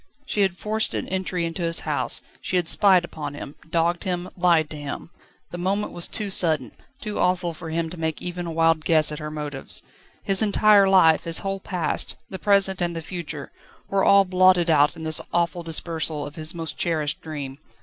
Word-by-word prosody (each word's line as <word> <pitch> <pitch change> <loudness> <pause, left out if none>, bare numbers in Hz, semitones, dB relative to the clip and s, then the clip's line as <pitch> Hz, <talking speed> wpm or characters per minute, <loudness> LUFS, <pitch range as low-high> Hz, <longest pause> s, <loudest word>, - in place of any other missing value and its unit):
She 210 - -1
had 190 -2 +1
forced 220 +3 -1
an - - -3
entry 185 -2 -2
into 165 +2 -5
his 165 -1 0
house; - - -2 0.2
she - - -3
had 175 -2 +1
spied 185 -2 +4
upon 150 -4 -7
him, 145 -1 -8 0.2
dogged 170 +1 0
him, 180 -1 -3
lied 170 -3 +3
to - - -6
him. 145 +3 -7 0.4
The 175 - -6
moment 195 +4 -1
was 170 - -3
too 210 -2 -3
sudden, 155 -10 +1 0.3
too 210 -4 -4
awful 180 -1 +1
for 160 +1 -8
him 165 +1 -1
to 180 - -8
make 160 -1 -2
even 175 0 -5
a - - -4
wild 165 -1 +2
guess 155 -2 +4
at 150 - -5
her 150 0 -5
motives. 150 -3 -1 0.4
His 195 +1 +5
entire 210 -1 +5
life, 165 -5 +5
his 165 -1 +1
whole 195 0 -2
past, 175 -5 -2 0.2
the 190 - -6
present, 195 -2 +3
and 170 -1 -1
the 165 - -4
future, 160 -4 -6 0.4
were 195 -1 +1
all 200 0 +6
blotted 185 -2 +4
out 145 -1 +4
in 160 - -9
this 155 -1 +1
awful 170 0 0
dispersal 160 -2 -1
of 145 0 -9
his 155 +1 -4
most 165 -2 -6
cherished 155 -4 -1
dream. 145 -3 -7
170 Hz, 200 wpm, -23 LUFS, 155-185 Hz, 0.4 s, all